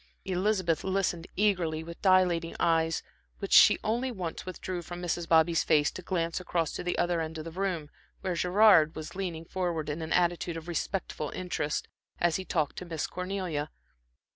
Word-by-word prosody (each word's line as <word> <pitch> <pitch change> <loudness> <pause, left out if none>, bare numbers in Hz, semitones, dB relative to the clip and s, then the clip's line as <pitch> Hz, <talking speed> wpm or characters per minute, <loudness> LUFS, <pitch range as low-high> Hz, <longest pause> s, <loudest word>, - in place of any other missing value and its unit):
Elizabeth 185 -3 0
listened 190 -3 -1
eagerly 175 -6 +1
with 170 +1 -10
dilating 180 -3 +3
eyes, 165 -1 +2 0.3
which - - -3
she - - +8
only 240 +4 0
once 185 -5 -5
withdrew 185 -1 -4
from 175 +1 -8
Mrs. 175 -1 -2
Bobby's 165 0 +4
face, 150 -1 +3
to - - -8
glance 170 -2 -1
across 170 -3 -1
to - - -5
the 175 - -1
other 175 -1 +1
end 160 0 -4
of 155 - -6
the 165 - -6
room, 180 -4 -2 0.3
where 185 -2 -1
Mr. 170 - -3
Gerard 180 -4 +5
was 155 -1 -7
leaning 175 -4 -4
forward 170 -4 -2
in 150 +3 -3
an 160 - -5
attitude 175 -1 +1
of 165 +1 -9
respectful 170 -3 -3
interest, 175 -5 -2 0.3
as 170 -2 +2
he 190 - -6
talked 155 -5 -1
to 180 - -5
Miss 165 -3 -3
Cornelia. 180 -5 -3
175 Hz, 180 wpm, -29 LUFS, 160-185 Hz, 0.3 s, she